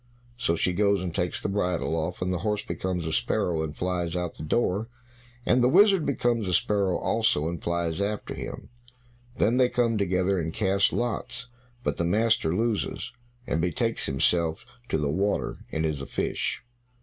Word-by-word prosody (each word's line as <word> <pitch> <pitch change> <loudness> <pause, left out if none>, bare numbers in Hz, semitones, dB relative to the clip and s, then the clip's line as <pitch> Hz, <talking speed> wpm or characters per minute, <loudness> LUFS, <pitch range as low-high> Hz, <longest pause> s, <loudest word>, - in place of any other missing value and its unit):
So 115 -9 0
she 90 +2 +1
goes 100 0 +2
and 90 -2 -3
takes 90 -1 -1
the - - -3
bridle 90 -5 0
off, 85 +3 -2
and 90 0 0
the 90 - -1
horse 105 -1 -1
becomes 90 -3 -2
a 80 - -2
sparrow, 80 0 +1
and 80 -1 -4
flies 90 -2 -2
out 90 -1 -1
at - - -24
the - - -7
door, 105 +4 +1 0.6
and 125 - +4
the 125 - +5
wizard 195 -1 +5
becomes 120 -6 +1
a 90 - +2
sparrow 100 -3 +2
also, 110 -9 +1
and 85 -1 -4
flies 85 +1 -1
after 105 +1 -2
him. - - -7 0.7
Then 115 +3 +3
they 125 -1 +4
come 115 -3 +1
together 95 0 +1
and 80 -1 -2
cast 100 -1 +2
lots, 120 +1 -3 0.3
but - - -1
the - - 0
master 105 -1 +2
loses, 115 +2 -1 0.3
and 80 - 0
betakes 85 -2 0
himself 80 +4 +1 0.2
to - - +1
the 75 -2 0
water 95 +8 -1
and 80 0 0
is 75 -3 -1
a 70 - -6
fish. - - -2
95 Hz, 185 wpm, -27 LUFS, 85-110 Hz, 0.7 s, the